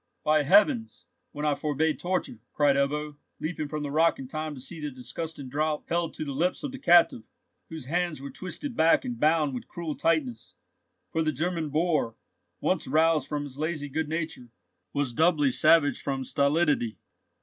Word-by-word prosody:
"By 155 0 +4
heavens, 210 - +3 0.3
when 150 +1 -4
I 150 - +3
forbade 150 +2 0
torture!" 180 -10 -2
cried 145 -2 +3
Ebbo, 145 +2 -1 0.2
leaping 155 -1 -3
from 150 0 -4
the 145 - -4
rock 165 +3 +3
in 135 - -7
time 155 +2 -4
to - - -9
see 160 +6 -7
the 150 - -3
disgusting 140 +3 -6
draught 150 +3 -1
held 170 -1 -1
to 155 - -4
the 140 - -4
lips 170 - -1
of 285 - -3
the 265 - -8
captive, 175 - +5 0.5
whose 160 -5 -7
hands 175 +1 -1
were 140 +1 -7
twisted 235 +8 -6
back 165 +9 +4
and 245 -2 -4
bound 155 -2 +3
with 125 - -6
cruel 170 -3 -5
tightness; 145 -9 -1 0.6
for 160 - 0
the 155 -1 +1
German 160 +2 -2
boor, 155 -6 0 0.4
once - - 0
roused 155 0 +3
from 150 -1 -2
his 140 -1 -9
lazy 155 -2 -2
good 155 +2 -2
nature, 155 -6 -4 0.4
was 140 -4 -1
doubly 150 -1 +3
savage 145 +3 +4
from 135 -1 -2
stolidity. 140 -4 +1
155 Hz, 180 wpm, -27 LUFS, 140-165 Hz, 0.6 s, captive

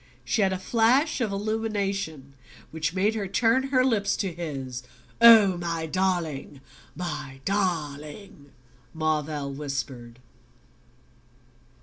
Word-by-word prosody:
She 225 - +1
had 195 -1 +3
a 190 - -1
flash 240 - +2
of 220 -4 0
illumination 200 -8 -2 0.4
which 160 +2 -2
made 200 +4 +2
her 210 -3 -3
turn 230 +6 +2
her 255 -2 +3
lips 205 -5 +1
to 190 -4 -2
his. 135 -7 -5 0.4
"Oh, 220 -6 +8
my 165 -2 -2
darling 165 -6 -2 0.4
my 145 -5 -5
darling!" 155 -4 -3 0.5
Marvell 155 -3 -1
whispered. 135 -4 -5
180 Hz, 105 wpm, -26 LUFS, 150-210 Hz, 0.5 s, Oh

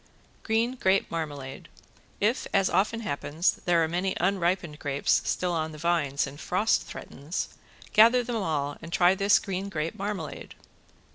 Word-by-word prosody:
~GREEN 230 +3 0
GRAPE 190 -3 +2
MARMALADE~ 145 -5 -5 0.5
If, 220 +5 +1
as 195 -1 +3
often 215 +5 +1
happens, 160 -3 -1
there 170 -2 +4
are - - +1
many 180 +3 -1
unripened 175 -5 0
grapes 140 -1 +1
still 180 -1 0
on 160 -2 -2
the - - -9
vines 150 -4 +1
and 140 +1 -9
frost 205 +5 +1
threatens, 145 +6 -5 0.4
gather 235 +3 +6
them 235 -1 -3
all 150 -7 -1
and 165 - -9
try 175 +1 +5
this 200 +1 +4
green 195 0 -3
grape 165 -2 -2
marmalade. 195 -6 -5
175 Hz, 150 wpm, -27 LUFS, 155-200 Hz, 0.5 s, gather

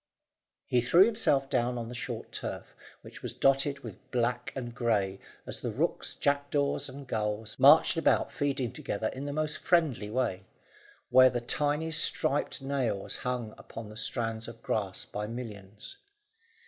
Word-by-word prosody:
He 125 - +2
threw 170 +10 +6
himself 210 -12 +2
down 125 -1 0
on 115 -1 -4
the 120 - -7
short 120 - -5
turf, - - -6 0.3
which - - -11
was - - -6
dotted 135 +1 +2
with 110 -6 -11
black 125 0 0
and 120 -3 -5
grey, 105 -6 0 0.3
as - - -4
the - - -2
rooks, - - -1
jackdaws, 140 0 0
and 140 +1 -9
gulls 110 -2 -2
marched 150 +4 +7
about 165 - +2
feeding 135 -5 -1
together 110 +2 -3
in 135 +2 -6
the 145 - -3
most 155 +1 -2
friendly 155 -12 +1
way, 95 -6 -1 0.6
where 130 +1 +8
the 125 -1 -1
tiny 150 +6 0
striped 155 - +1
snails 135 -7 -2
hung 125 -3 -3
upon 110 -2 -9
the 105 - -11
strands 115 0 -2
of 115 -1 -11
grass 100 -3 -2
by 105 0 -5
millions. 105 - -8
125 Hz, 155 wpm, -30 LUFS, 110-140 Hz, 0.6 s, where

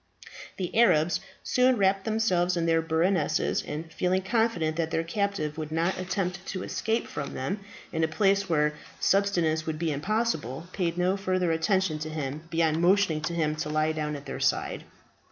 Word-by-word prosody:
The 180 -3 -4
Arabs 175 -8 +4 0.2
soon 255 0 +3
wrapped 195 -1 +2
themselves 185 -5 +1
in 170 - 0
their 165 0 +3
burnouses, 165 0 +1
and 160 +2 -6
feeling 185 +2 +1
confident 205 -7 +1
that 165 -1 0
their 165 0 0
captive 165 -4 -2
would 155 -1 -5
not 165 +4 0
attempt 185 -1 -2
to 185 - -4
escape 225 +2 -1
from 145 -1 -5
them, 185 +11 -2 0.3
in 160 -1 0
a - - +3
place 195 +4 +2
where 150 -2 +2 0.3
subsistence 175 -6 +2
would 155 -1 -2
be 165 0 -1
impossible, 160 - -1
paid 175 -3 -1
no 180 +2 +2
further 185 -3 0
attention 165 0 +1
to 155 +1 -4
him 150 -1 -4
beyond 165 -1 +1
motioning 180 -3 +3
to 170 +2 -2
him 155 -2 0
to 150 - -3
lie 155 +1 +1
down 150 -1 -2
at 140 - -8
their - - -5
side. - - 0
170 Hz, 175 wpm, -27 LUFS, 155-195 Hz, 0.3 s, Arabs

